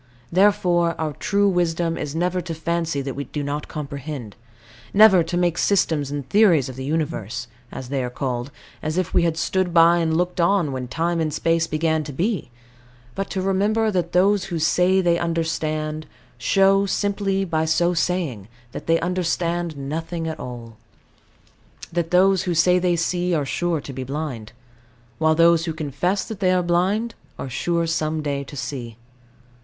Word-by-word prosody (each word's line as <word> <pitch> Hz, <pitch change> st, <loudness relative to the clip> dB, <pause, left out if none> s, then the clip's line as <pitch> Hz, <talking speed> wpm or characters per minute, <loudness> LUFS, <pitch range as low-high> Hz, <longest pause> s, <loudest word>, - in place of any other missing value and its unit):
Therefore 175 Hz, -3 st, +3 dB
our 155 Hz, -2 st, -2 dB
true 200 Hz, +8 st, +1 dB
wisdom 170 Hz, -2 st, 0 dB
is 150 Hz, 0 st, -5 dB
never 180 Hz, +2 st, 0 dB
to 165 Hz, -1 st, -5 dB
fancy 165 Hz, -2 st, -2 dB
that 135 Hz, -1 st, -4 dB
we 140 Hz, +1 st, -4 dB
do 150 Hz, -, -4 dB, 0.2 s
comprehend: 140 Hz, -6 st, -6 dB, 0.6 s
never 200 Hz, -3 st, +7 dB
to 170 Hz, +2 st, -2 dB
make 175 Hz, -1 st, +1 dB
systems 160 Hz, -8 st, +1 dB
and 140 Hz, -2 st, -5 dB
theories 180 Hz, -, +4 dB
of 130 Hz, -, -7 dB
the 130 Hz, -, -6 dB
Universe 125 Hz, -6 st, -3 dB, 0.2 s
(as 130 Hz, -2 st, -7 dB
they 135 Hz, -2 st, -1 dB
are 125 Hz, -, -3 dB
called) 125 Hz, 0 st, -3 dB, 0.3 s
as 155 Hz, +2 st, -3 dB
if 185 Hz, -2 st, -1 dB
we -, -, +4 dB
had 165 Hz, -1 st, 0 dB
stood 180 Hz, +1 st, 0 dB
by 170 Hz, +1 st, +6 dB
and 160 Hz, -1 st, +1 dB
looked 180 Hz, 0 st, 0 dB
on 170 Hz, -3 st, +2 dB
when 130 Hz, -1 st, -4 dB
time 165 Hz, +5 st, -1 dB
and 155 Hz, -1 st, 0 dB
space 165 Hz, +2 st, +1 dB
began 160 Hz, 0 st, 0 dB
to 150 Hz, -, -7 dB
be; 180 Hz, -, -2 dB, 0.6 s
but 195 Hz, +7 st, -4 dB
to 190 Hz, -1 st, -2 dB
remember 210 Hz, +3 st, +1 dB
that 175 Hz, -3 st, -1 dB
those 195 Hz, +2 st, +3 dB
who 175 Hz, -3 st, -3 dB
say 180 Hz, +4 st, +3 dB
they 170 Hz, -2 st, +2 dB
understand, 155 Hz, -2 st, -2 dB, 0.3 s
show, 195 Hz, +8 st, +3 dB
simply 195 Hz, -1 st, 0 dB
by 160 Hz, -3 st, 0 dB
so 170 Hz, +2 st, +2 dB
saying, 165 Hz, -, -1 dB, 0.2 s
that -, -, -8 dB
they 165 Hz, 0 st, +3 dB
understand 175 Hz, -2 st, -1 dB
nothing 160 Hz, +4 st, -4 dB
at 160 Hz, -1 st, -5 dB
all; 115 Hz, -3 st, -8 dB, 1.2 s
that 170 Hz, -1 st, -1 dB
those 185 Hz, +1 st, +4 dB
who 175 Hz, -2 st, -1 dB
say 180 Hz, +3 st, +4 dB
they 180 Hz, -1 st, +1 dB
see, 175 Hz, +1 st, 0 dB
are 150 Hz, -3 st, 0 dB
sure 170 Hz, +3 st, -1 dB
to 140 Hz, -1 st, -8 dB
be 130 Hz, 0 st, -5 dB
blind; 130 Hz, -6 st, -5 dB, 0.7 s
while 160 Hz, 0 st, +3 dB
those 165 Hz, 0 st, +4 dB
who 165 Hz, -, -2 dB
confess 170 Hz, +6 st, -1 dB
that 220 Hz, -4 st, -7 dB
they 185 Hz, -2 st, +2 dB
are 180 Hz, -1 st, +2 dB
blind, 190 Hz, +7 st, +1 dB, 0.2 s
are 130 Hz, -, -6 dB
sure 170 Hz, +6 st, 0 dB
some 160 Hz, -1 st, -1 dB
day 140 Hz, -1 st, -2 dB
to 140 Hz, +1 st, -10 dB
see. 120 Hz, -4 st, -5 dB
165 Hz, 175 wpm, -22 LUFS, 150-180 Hz, 1.2 s, never